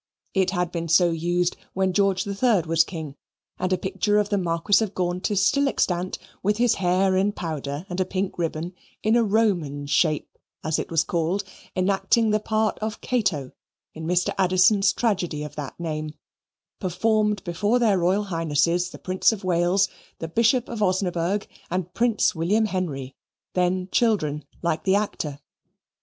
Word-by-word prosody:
It 190 -2 +2
had 180 -2 -1
been 170 -1 -3
so 170 +1 +4
used 175 +2 0 0.2
when 190 -1 0
George 195 -1 +2
III 200 0 +2
was 165 0 +4
king; 160 -5 -7 0.4
and 185 0 -1
a 185 - +3
picture 195 +3 0
of 210 -1 +1
the 205 - +1
Marquis 175 +4 +2
of 210 -2 -5
Gaunt 180 +2 -1
is 200 -1 +2
still 280 +4 +3
extant, 180 -8 0 0.2
with 210 +2 +1
his 240 -1 +3
hair 185 +1 +2
in 195 +2 +2
powder 155 -3 -4
and 180 0 -5
a - - +4
pink 185 -1 -3
ribbon, 165 +1 -2 0.3
in 220 +2 +3
a 240 - +4
Roman 190 -10 +1
shape, 155 +1 0 0.2
as 155 0 0
it - - -4
was 165 -1 +2
called, 175 +4 -1 0.3
enacting 195 +4 +2
the 215 - +2
part 215 0 0
of 215 0 -4
Cato 190 - -1 0.4
in 160 0 -6
Mr. 180 +1 +1
Addison's 190 +2 +4
tragedy 185 -9 -1
of 150 -1 -8
that 145 0 -7
name, 155 -2 -4 0.6
performed 210 +2 +1
before 205 +7 +1
their 215 -6 +3
Royal 185 +4 +2
Highnesses 170 -1 0
the - - -10
Prince 185 +4 +2
of 215 -3 -6
Wales, 180 +2 +2 0.3
the 165 - -5
Bishop 230 +7 +2
of 230 -2 -5
Osnaburgh, 185 0 0 0.2
and 180 0 -3
Prince 235 -2 +2
William 190 +7 +1
Henry, 150 -10 -3 0.4
then 180 0 +1
children 155 -11 +1 0.2
like 170 -2 0
the 190 0 +3
actor. 165 -8 -2
185 Hz, 165 wpm, -24 LUFS, 170-205 Hz, 0.6 s, so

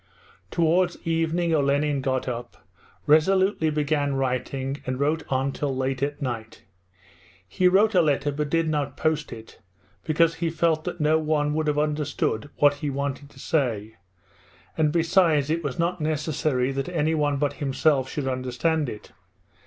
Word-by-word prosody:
Towards 175 +1 +2
evening 165 +1 0
Olenin 145 -1 +1
got 130 -1 -1
up, 120 -1 -6 0.4
resolutely 185 +2 +3
began 145 -2 0
writing, 135 +1 -2
and 130 0 -2
wrote 150 +3 +1
on 135 +1 0
till 135 -1 -3
late 130 0 -2
at 145 +1 -2
night. 115 -4 -5 0.8
He 180 - +2
wrote 205 +4 +4
a 180 - +5
letter, 145 -2 +1
but 150 +1 -3
did 165 +1 +1
not 145 -3 -2
post 155 -1 -1
it 115 -1 -11 0.4
because 165 +1 +2
he 170 - +1
felt 160 -1 0
that 180 -1 -4
no 155 +1 +3
one 150 -1 0
would 155 0 -1
have 150 -1 +1
understood 150 -5 -1
what 145 -1 +3
he 145 0 -3
wanted 140 0 -4
to 135 - -17
say, 115 -8 -1 0.8
and 155 -2 +2
besides 165 -3 +2
it 165 +1 -1
was 140 -4 -3
not 170 +1 -1
necessary 150 -4 0
that 135 +5 -3
anyone 150 -3 0
but 145 0 0
himself 135 -1 +1
should 145 -3 -3
understand 130 +4 -1
it. 105 - -10
150 Hz, 155 wpm, -25 LUFS, 135-160 Hz, 0.8 s, a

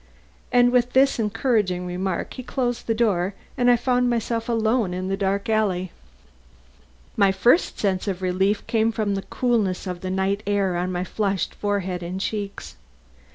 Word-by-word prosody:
And 245 0 +5
with 250 0 +2
this 270 -1 +4
encouraging 210 -5 0
remark 180 +1 -3
he - - -6
closed 245 -1 -2
the 225 - +1
door 200 -4 +1 0.2
and 245 -2 +3
I 245 - +7
found 245 +1 +1
myself 230 0 -1
alone 225 -4 +1
in 185 +1 -3
the 195 - 0
dark 195 0 -1
alley. 195 -5 0 1.2
My 195 -1 +4
first 235 - +3
sense 195 -1 -1
of 190 -1 -3
relief 190 +3 +1
came 225 0 +1
from 215 -2 -1
the 195 - -2
coolness 220 -6 0
of 180 -2 -5
the 185 - -4
night 190 +2 0
air 200 -3 +1
on 180 +1 -1
my 180 0 -2
flushed 195 0 -1
forehead 190 -3 -2
and 175 +2 -4
cheeks. 205 0 -4
205 Hz, 165 wpm, -23 LUFS, 185-235 Hz, 1.2 s, I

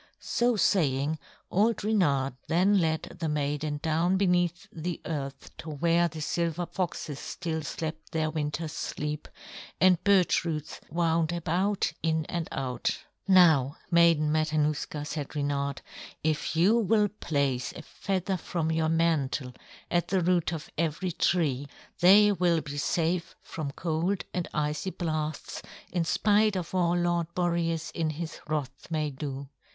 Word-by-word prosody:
So 240 0 +1
saying, 155 -7 +2 0.3
old 215 +3 +2
Reynard 145 -12 +2
then 190 +5 +4
led 160 -2 +1 0.2
the 165 -3 -1
maiden 145 0 -1
down 165 +3 +2
beneath 180 -1 +1
the 170 +1 -4
earth 140 -4 -5
to 160 - -7
where 170 +3 +2
the 160 -1 -7
silver 170 +2 -1
foxes 170 -6 -3
still 160 -2 -4
slept 155 +1 -5
their 160 -2 0
winter's 155 +1 -2
sleep, 150 0 -4 0.5
and 185 -2 +5
birch 195 -3 +4
roots 155 -3 -4
wound 165 0 +1
about 175 +3 0
in 160 -1 +1
and 170 -1 -3
out. 125 -3 -2 0.3
"Now, 160 -7 +5
Maiden 165 -3 +5
Matanuska," 155 -1 0
said 150 -1 -5
Reynard, 140 -1 -1 0.4
"if 155 +1 0
you 195 +8 +4
will 210 0 +3
place 140 -10 -1
a - - -9
feather 190 -1 -2
from 165 -1 -2
your 160 0 +1
mantle 155 -6 +1 0.4
at 175 -1 +2
the 190 -1 +1
root 175 -1 +2
of 160 -3 -5
every 170 +3 0
tree, 150 -6 +1 0.3
they 205 +4 +7
will 175 -4 +2
be 145 -1 -7
safe 170 +3 0
from 155 -3 -5
cold 170 +5 -1
and 180 -2 -2
icy 150 +4 -1
blasts, 155 -4 -3 0.3
in 175 -2 +1
spite 210 +3 +3
of 180 -2 -4
all 175 -1 +2
Lord 175 -1 +1
Boreas 170 -2 0
in 160 -2 -1
his 160 +1 -5
wrath 145 -3 -3
may 155 -2 -1
do. 135 0 -5
165 Hz, 140 wpm, -28 LUFS, 150-175 Hz, 0.5 s, they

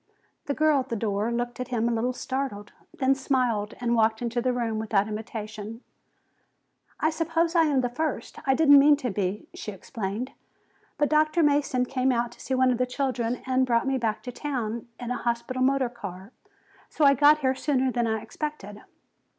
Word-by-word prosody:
The 285 - -1
girl 310 -2 +3
at 260 0 -4
the 235 - -1
door 210 +1 -1
looked 240 0 -3
a 250 -2 -2
little 235 +2 +1
startled, 255 -5 -4 0.2
then 265 0 +2
smiled 250 -6 0
and 240 -1 0
walked 220 -1 +2
into 240 0 -2
the 255 +1 +1
room 230 -3 -1
without 210 -2 +1
invitation. 215 +1 -6 1.2
"I 315 - +2
suppose 330 +1 0
I 330 -2 +5
am 270 -5 +2
first. 255 -1 -4
I 265 - +4
didn't 285 -1 +7
mean 290 +1 +6
to 255 -5 -3
be," 195 +1 -2
she 210 - -6
explained. 210 +4 -5 0.7
"But 295 -1 +2
Dr. 310 +2 +3
Mason 285 -4 +2
came 260 0 +1
out 240 -1 0
to - - -17
see 265 - -2
one 255 0 +4
of 245 - -1
the 250 - +1
children 250 -2 -2
and 260 0 +2
brought 235 -2 +2
me 270 0 0
back 215 -2 -2
to 250 - -5
town 235 -5 -4
in 245 -1 -5
the 250 - -1
hospital 235 +2 -2
motor 265 0 +3
car. 200 -3 -9 0.6
So 305 - +1
I 280 - +7
got 295 +2 +5
here 260 -1 +2
sooner 265 -1 0
than 240 -1 0
I 220 -1 -1
expected." 220 -6 -6
250 Hz, 185 wpm, -26 LUFS, 225-275 Hz, 1.2 s, didn't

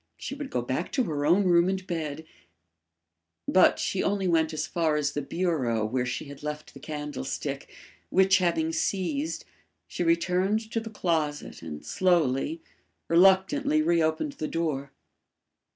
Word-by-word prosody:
She - - -6
would 285 -1 -6
go 120 - -1
back 130 +8 -2
to 260 - +2
her 150 -7 -1
own 180 +5 +5
room 175 -1 +4
and 190 -1 -2
bed 160 -3 -4 1.2
But 185 - +5
she 190 - -1
only 195 -1 0
went 160 -2 +2
as 155 -1 -2
far 160 -1 0
as 145 -2 0
the 145 - -3
bureau 135 -10 0
where 125 +3 -1
she 120 - -3
had 140 -1 -11
left 150 0 -6
the - - -11
candlestick, 150 - -5 0.4
which 190 +1 +4
having 315 - +1
seized, 285 - -1 0.4
she - - -5
returned 185 +6 +1
to 225 - 0
the 225 0 -7
closet 160 -8 -2
and 75 -3 -8
slowly, 180 - +1 0.5
reluctantly 195 - +4
reopened 165 - +1
the 155 - -4
door. 150 -5 -2
170 Hz, 150 wpm, -27 LUFS, 150-195 Hz, 1.2 s, own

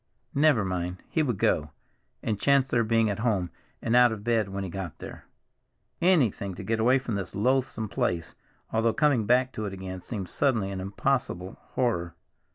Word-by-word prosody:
Never 140 -7 +4
mind, 90 -1 -2
he 160 - +1
would 125 -9 0
go, 75 -4 +1 0.5
and 105 -2 -2
chance 140 -2 +3
their 115 - +2
being 115 0 +2
at 100 - -4
home 105 -6 0 0.3
and 115 +1 +1
out 125 -1 +7
of 105 -2 -5
bed 115 -3 +1
when 95 0 -4
he 95 - -4
got 95 -4 -5
there. - - -10 0.8
Anything 130 - +2
to - - -7
get 115 0 -1
away 125 +4 +4
from 125 -3 -4
this 100 -3 -4
loathsome 120 0 +1
place, 85 -4 -1 0.4
although 110 0 +2
coming 140 -8 +2
back 125 +2 +3
to 110 -3 -4
it 95 - -6
again 95 -1 -6
seemed 100 -3 -5
suddenly 110 -4 0
an 95 -1 -4
impossible 100 -2 -1 0.2
horror. 85 -10 0
110 Hz, 180 wpm, -27 LUFS, 95-125 Hz, 0.8 s, out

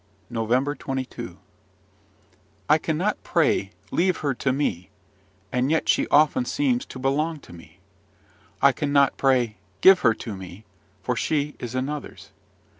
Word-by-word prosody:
NOVEMBER 120 +5 0
22 135 -2 -6 1.3
I 155 - +5
cannot 170 +7 -1
pray, 155 - +1 0.2
"Leave 180 +1 +1
her 140 - +2
to 130 +1 -1
me!" 110 -10 -2 0.6
and 125 +2 0
yet 160 +1 +1
she - - +2
often 155 - +4
seems 260 -1 0
to - - -9
belong 150 +5 -1
to - - -14
me. 85 - -15 0.8
I - - +7
cannot 140 -1 +2
pray, 125 -6 +2 0.2
"Give 190 -1 +8
her 115 -3 +3
to 110 -2 -7
me!" 95 +2 -10 0.4
for 125 - -1
she 150 +2 -1
is 120 0 -6
another's. 140 +3 -5
140 Hz, 135 wpm, -24 LUFS, 125-155 Hz, 1.3 s, Give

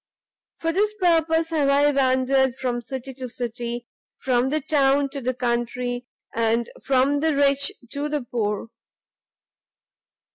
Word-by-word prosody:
"For 330 - -1
this 420 +3 +1
purpose 330 -3 +2
have 295 -4 +2
I 285 +1 +4
wandered 265 -1 +2
from 250 -2 -2
city 265 +1 -6
to 255 -1 -7
city, 240 0 -4 0.3
from 250 0 +1
the 305 +2 +1
town 280 -2 +2
to 275 0 -6
the 255 0 -1
country, 245 0 -2 0.3
and 230 +1 +1
from 275 +2 +2
the 315 0 +1
rich 280 0 +3 0.2
to 290 +1 -2
the 295 -3 -2
poor. 225 -2 -2
265 Hz, 135 wpm, -24 LUFS, 245-290 Hz, 0.3 s, I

